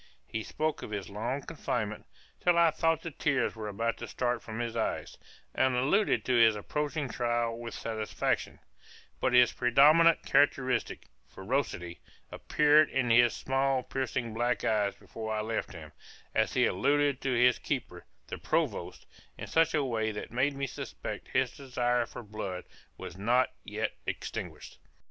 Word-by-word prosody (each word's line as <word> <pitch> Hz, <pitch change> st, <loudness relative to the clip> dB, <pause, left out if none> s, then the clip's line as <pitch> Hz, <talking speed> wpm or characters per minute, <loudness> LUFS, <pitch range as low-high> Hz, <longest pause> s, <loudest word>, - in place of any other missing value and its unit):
He 110 Hz, -, -4 dB
spoke 155 Hz, +7 st, -2 dB
of -, -, -7 dB
his 100 Hz, -3 st, -5 dB
long 120 Hz, +7 st, -3 dB
confinement, 115 Hz, -9 st, -4 dB, 0.3 s
till 175 Hz, -1 st, +3 dB
I 170 Hz, -1 st, +5 dB
thought 165 Hz, 0 st, +1 dB
the 165 Hz, -, -5 dB
tears 145 Hz, -3 st, 0 dB
were 110 Hz, -1 st, -5 dB
about 115 Hz, +3 st, -2 dB
to -, -, -7 dB
start 120 Hz, -1 st, -1 dB
from 110 Hz, 0 st, -7 dB
his 120 Hz, -1 st, -3 dB
eyes, 115 Hz, -, -2 dB, 0.4 s
and 130 Hz, -1 st, +2 dB
alluded 145 Hz, +12 st, +2 dB
to 130 Hz, -, +1 dB
his 115 Hz, -2 st, +5 dB
approaching 150 Hz, +7 st, -2 dB
trial 120 Hz, -2 st, -1 dB
with 115 Hz, 0 st, -7 dB
satisfaction; 110 Hz, -2 st, -2 dB, 0.6 s
but 130 Hz, -, +1 dB
his 125 Hz, -1 st, +6 dB
predominant 150 Hz, +7 st, +5 dB
characteristic, 135 Hz, -2 st, +1 dB, 0.2 s
ferocity, 95 Hz, -6 st, -3 dB, 0.3 s
appeared 150 Hz, 0 st, +4 dB
in 125 Hz, -3 st, 0 dB
his 120 Hz, 0 st, +5 dB
small 135 Hz, -1 st, 0 dB
piercing 130 Hz, -3 st, -3 dB
black 120 Hz, -1 st, 0 dB
eyes 105 Hz, -2 st, +1 dB
before 110 Hz, -1 st, -6 dB
I 105 Hz, -, -1 dB
left 110 Hz, +1 st, -3 dB
him, 80 Hz, -4 st, -10 dB, 0.4 s
as -, -, +1 dB
he -, -, +4 dB
alluded 145 Hz, +7 st, +1 dB
to 135 Hz, -, 0 dB
his 125 Hz, +1 st, +4 dB
keeper, 100 Hz, -11 st, -4 dB, 0.2 s
the -, -, -7 dB
Provost, -, -, -2 dB, 0.3 s
in -, -, -6 dB
such 165 Hz, 0 st, +2 dB
a 150 Hz, -, +2 dB
way 110 Hz, -3 st, -1 dB
that 105 Hz, -, -7 dB
made 135 Hz, +4 st, +1 dB
me 140 Hz, 0 st, -2 dB
suspect 135 Hz, -, -7 dB
his 130 Hz, -1 st, 0 dB
desire 125 Hz, -3 st, 0 dB
for -, -, -9 dB
blood 100 Hz, -4 st, -5 dB, 0.3 s
was -, -, -8 dB
not 120 Hz, +6 st, +2 dB
yet -, -, -3 dB, 0.2 s
extinguished. -, -, -6 dB
125 Hz, 160 wpm, -30 LUFS, 110-140 Hz, 0.6 s, his